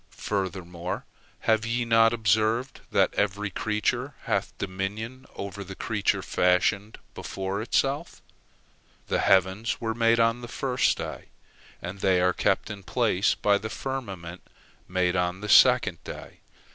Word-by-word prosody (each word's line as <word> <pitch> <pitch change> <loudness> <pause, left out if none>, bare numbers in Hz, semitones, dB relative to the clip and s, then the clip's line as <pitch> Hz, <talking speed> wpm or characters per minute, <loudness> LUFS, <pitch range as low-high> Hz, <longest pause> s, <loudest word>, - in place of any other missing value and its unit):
Furthermore, 90 -3 -3 0.4
have 110 -1 +2
ye 120 +1 -1
not 115 -1 +5
observed 110 +3 +1
that - - +2
every 100 0 -1
creature 115 +7 -1
hath - - -2
dominion 105 +7 -5
over 100 0 -6
the 100 0 -9
creature 105 -1 0
fashioned 100 +4 +1 0.2
before 95 +1 -4
itself? 140 +7 -1 0.9
The - - +1
heavens 95 +4 +2
were 115 -1 -2
made 115 0 +3
on 115 +1 +2
the 120 - -7
first 125 +1 +1
day, - - -6 0.6
and 95 +3 -6
they 95 -1 +3
are 90 0 +3
kept 105 - 0
in 100 -1 -7
place 105 -1 +1
by 100 -1 +2
the 110 - -5
firmament 100 -10 -5 0.5
made 90 0 +1
on 90 +1 -1
the 105 - -5
second - - +5
day. - - -9
105 Hz, 135 wpm, -26 LUFS, 95-115 Hz, 0.9 s, not